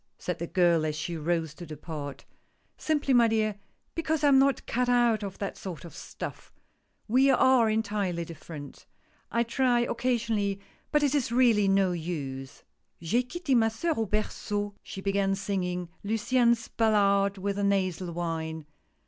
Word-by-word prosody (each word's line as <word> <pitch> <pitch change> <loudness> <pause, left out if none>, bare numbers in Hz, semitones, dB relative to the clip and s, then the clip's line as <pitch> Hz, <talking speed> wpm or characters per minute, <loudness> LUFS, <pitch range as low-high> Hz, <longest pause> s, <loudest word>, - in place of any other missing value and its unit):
said 180 -2 -4
the 170 - -3
girl 170 -2 +3
as 155 -1 -1
she 160 +3 -4
rose 160 -1 -1
to 175 - -10
depart. 150 -2 -7 0.2
" - - -43
Simply, 295 -3 +1
my 240 -2 +6
dear, 215 -2 0 0.3
because 320 -2 -1
I 290 - +6
am 270 -1 +6
not 275 -1 +2
cut 250 +1 0
out 240 -3 +3
of 195 -2 -6
that 200 - -5
sort 175 -5 -7
of 170 - -11
stuff - - -8 0.3
— - - -45
we 260 +5 +4
are 260 -3 +5
entirely 205 -6 -1
different 155 -3 -10 0.2
— - - -37
I - - +4
try 240 0 +2
occa 245 +2 0
sionally, 205 -4 -1 0.3
but 300 -1 +3
it 285 -1 +2
is 275 -6 0
really 235 -5 +4
no 195 -1 +3
use." 145 -6 -5 0.2
" - - -48
J'ai 200 +9 +1
quitte 280 +2 -1
ma 225 -2 +4
soeur 270 +10 -1
au 225 -1 -1
berceau," 205 0 -2
she 195 - -8
began, 195 0 +1
singing 180 -3 -2 0.2
Luciane's 235 +2 +2
ballad 200 -3 +2
with 200 +1 -2
a - - 0
nasal 185 -3 0
whine. 160 -2 -4
200 Hz, 175 wpm, -28 LUFS, 175-235 Hz, 0.3 s, my